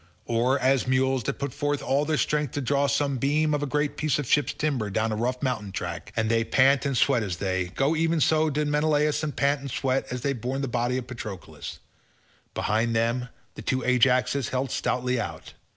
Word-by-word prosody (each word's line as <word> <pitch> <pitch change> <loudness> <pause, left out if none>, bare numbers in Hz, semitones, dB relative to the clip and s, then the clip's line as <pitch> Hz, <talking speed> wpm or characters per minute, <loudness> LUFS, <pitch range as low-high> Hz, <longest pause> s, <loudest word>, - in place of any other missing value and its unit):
Or 120 +3 +2
as 130 -1 +2
mules 130 0 +2
that - - -2
put 140 -3 -4
forth 145 0 -1
all 140 +3 +1
their 155 0 0
strength 150 -3 0
to 145 - -2
draw 140 +2 +1
some 140 -1 0
beam 150 +3 +2
or 145 0 0
great 145 +1 -1
piece 155 -2 +1
of 145 - -2
ship's 145 +4 +2
timber 135 -9 -1
down 110 +3 0
a - - -1
rough 125 +4 -2
mountain 110 -7 -2
track, 85 0 -5
and 110 -1 +1
they 115 0 +2
pant 135 +4 +3
and 135 -2 -1
sweat 130 -3 +3
as 95 -5 -3
they 95 -1 -1
go—even 160 +4 +1
so 155 +1 +3
did 150 +1 -1
Menelaus 150 0 +2
and 150 -2 -2
Meriones - - -25
pant 140 0 +2
and 140 - -6
sweat 135 +1 -1
as 125 -1 -4
they 140 +1 0
bore 125 +2 -3
the 135 0 -2
body 120 +1 0
of 130 - -4
Patroclus. 110 -7 -8 0.8
Behind 115 +2 0
them 120 +2 0 0.2
the - - -9
two 130 -1 -1
Ajaxes 125 0 +2
held 130 +1 -2
stoutly 125 0 0
out. 85 -5 -7
130 Hz, 210 wpm, -26 LUFS, 120-145 Hz, 0.8 s, pant